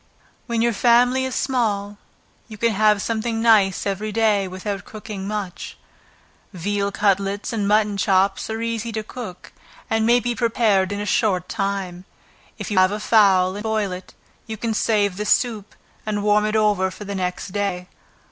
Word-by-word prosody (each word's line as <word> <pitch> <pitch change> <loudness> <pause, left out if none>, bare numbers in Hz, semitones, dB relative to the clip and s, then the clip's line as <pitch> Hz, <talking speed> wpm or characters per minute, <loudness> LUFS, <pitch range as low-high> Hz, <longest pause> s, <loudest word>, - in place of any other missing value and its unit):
When 230 -1 0
your 235 0 +2
family 245 +3 +3
is 260 - -4
small, 210 -6 -1 0.5
you 215 -2 -10
can 230 +2 +2
have 210 -1 +3
something 225 0 -2
nice 215 -4 +3
every 205 +2 -2
day, 210 -3 +2
without 195 +2 -5
cooking 210 -2 -7
much. 205 -4 -5 0.8
Veal 200 +3 -2
cutlets, 200 +2 0
and 210 -3 -1
mutton 210 -1 +2
chops, 195 0 +1
are 220 +1 -3
easy 230 0 -3
to 220 0 -3
cook, 215 -5 -9 0.4
and 225 0 +2
may 240 +2 +4
be 245 0 -2
prepared 220 -5 +1
in 205 - -3
a - - -3
short 185 -4 +1
time. 195 -4 -3 0.5
If - - -6
you 195 - +3
have 185 +1 +4
a 210 - -3
fowl, 195 -4 +4
and - - -5
boil 215 -2 -1
it, 180 +1 -9 0.3
you 220 -1 -5
can 225 +1 -2
save 205 -3 +1
the 210 - -3
soup, 220 -4 0 0.3
and 210 -1 -2
warm 210 0 +3
it 215 - -2
over 205 -3 +2
for 200 - -10
the 200 - -5
next 180 0 -3
day. 185 -2 -3
210 Hz, 175 wpm, -22 LUFS, 195-225 Hz, 0.8 s, may